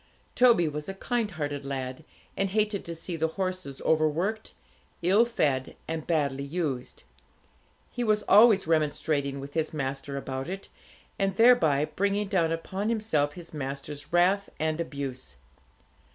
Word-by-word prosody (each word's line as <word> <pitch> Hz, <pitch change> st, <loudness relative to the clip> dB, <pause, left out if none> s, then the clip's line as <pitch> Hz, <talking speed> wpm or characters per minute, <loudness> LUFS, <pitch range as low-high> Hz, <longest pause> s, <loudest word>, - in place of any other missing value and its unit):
Toby 235 Hz, -9 st, +5 dB
was 150 Hz, +3 st, -4 dB
a 195 Hz, -, -5 dB
kind 230 Hz, +2 st, -1 dB
hearted 145 Hz, -5 st, -4 dB
lad, 135 Hz, +1 st, -4 dB, 0.3 s
and 195 Hz, -, 0 dB
hated 210 Hz, 0 st, 0 dB
to 170 Hz, -, -5 dB
see 170 Hz, +2 st, -5 dB
the 160 Hz, 0 st, +1 dB
horses 185 Hz, -7 st, -3 dB
over 155 Hz, -1 st, +4 dB
worked, 195 Hz, +8 st, -3 dB, 0.5 s
ill 200 Hz, +7 st, +5 dB
fed, 145 Hz, -, 0 dB
and 160 Hz, -1 st, -4 dB
badly 140 Hz, -5 st, 0 dB
used. 140 Hz, -4 st, -3 dB, 0.9 s
He 245 Hz, -, -3 dB
was 215 Hz, -2 st, +2 dB
always 210 Hz, -1 st, +6 dB
remonstrating 150 Hz, -3 st, 0 dB
with 140 Hz, +1 st, -8 dB
his 160 Hz, -1 st, -1 dB
master 140 Hz, 0 st, -3 dB
about 135 Hz, +2 st, -4 dB
it, 195 Hz, +1 st, -6 dB, 0.5 s
and 195 Hz, -1 st, +1 dB
thereby 170 Hz, -, +5 dB
bringing 200 Hz, +3 st, -1 dB
down 170 Hz, -5 st, +2 dB
upon 190 Hz, +6 st, -2 dB
himself 160 Hz, -11 st, +1 dB
his 170 Hz, 0 st, -10 dB
master's 145 Hz, +1 st, -5 dB
wrath 185 Hz, +4 st, +3 dB
and 160 Hz, +1 st, 0 dB
abuse. 135 Hz, -, -6 dB
160 Hz, 145 wpm, -28 LUFS, 145-195 Hz, 0.9 s, always